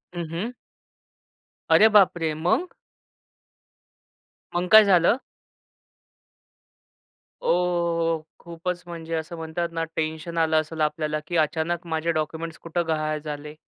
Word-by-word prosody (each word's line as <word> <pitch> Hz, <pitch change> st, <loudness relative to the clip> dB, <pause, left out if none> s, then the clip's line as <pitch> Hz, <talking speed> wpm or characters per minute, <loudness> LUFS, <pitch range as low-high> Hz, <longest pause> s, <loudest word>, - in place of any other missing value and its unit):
हं, 170 Hz, -1 st, -3 dB
हं. 190 Hz, +9 st, -3 dB, 1.2 s
अरे 220 Hz, -, +8 dB
बापरे! 170 Hz, -6 st, +4 dB
मग? 175 Hz, -, 0 dB, 1.9 s
मग 180 Hz, +1 st, 0 dB
काय 215 Hz, 0 st, +10 dB
झालं? 195 Hz, +3 st, +4 dB, 2.2 s
ओहोहो! 170 Hz, -2 st, +1 dB, 0.2 s
खूपच 170 Hz, +1 st, -5 dB
म्हणजे 165 Hz, -1 st, -7 dB
असं 160 Hz, +1 st, -4 dB
म्हणतात 165 Hz, +1 st, -3 dB
ना, 165 Hz, 0 st, -2 dB
टेन्शन 160 Hz, +2 st, -3 dB
आलं 160 Hz, -1 st, +3 dB
असेल 155 Hz, +1 st, -7 dB
आपल्याला, 155 Hz, 0 st, 0 dB
की 175 Hz, -, -1 dB
अचानक 160 Hz, +2 st, 0 dB
माझे 160 Hz, 0 st, 0 dB
डॉक्युमेंट्स 160 Hz, +1 st, -3 dB
कुठं 170 Hz, 0 st, -3 dB
गहाळ 155 Hz, -1 st, -1 dB
झाले? 150 Hz, 0 st, -7 dB
165 Hz, 110 wpm, -24 LUFS, 155-175 Hz, 2.2 s, काय